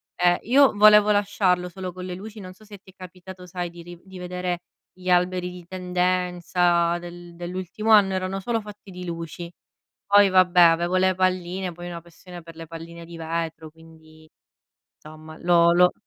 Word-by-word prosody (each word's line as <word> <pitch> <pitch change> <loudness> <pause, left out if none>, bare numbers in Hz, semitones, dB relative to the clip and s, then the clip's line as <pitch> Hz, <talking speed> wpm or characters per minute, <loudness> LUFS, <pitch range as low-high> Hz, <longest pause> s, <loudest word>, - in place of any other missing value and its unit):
Eh, 175 0 +2
io 270 +3 +4
volevo 210 0 +6
lasciarlo 190 -3 +1
solo 185 0 -7
con 180 0 -8
le 180 - -5
luci. 210 +3 -10
Non 185 -1 -10
so 215 +3 -20
se 205 -1 -12
ti 190 - -18
è - - -40
capitato, 185 0 -12
sai, 175 -1 -5
di 170 0 -12
riv 175 0 -12
di 190 -1 -12
vedere 180 -1 -4 0.3
gli 185 0 -8
alberi 180 0 +1
di 180 -1 -12
tendenza 180 -1 0
del 175 0 -11
dell'ultimo 185 +5 -4
anno, 200 -3 +6
erano 185 +1 -3
solo 230 +3 -2
fatti 210 -1 -13
di 180 0 -8
luci. 170 0 -7 0.5
Poi, 205 0 +5
vabbè, 185 -1 +4
avevo 170 +1 +4
le 185 0 +3
palline, 185 0 -1
poi 175 +1 -10
ho - - -6
una 170 -1 -7
passione 175 +1 -13
per 165 0 -14
le 165 0 -9
palline 165 +1 -10
di 170 0 -11
vetro, 165 -1 -4
quindi, 160 0 -19 0.7
insomma, 155 +1 -13
lo 170 -1 +4
lo 180 +1 +4
180 Hz, 185 wpm, -23 LUFS, 170-185 Hz, 0.7 s, volevo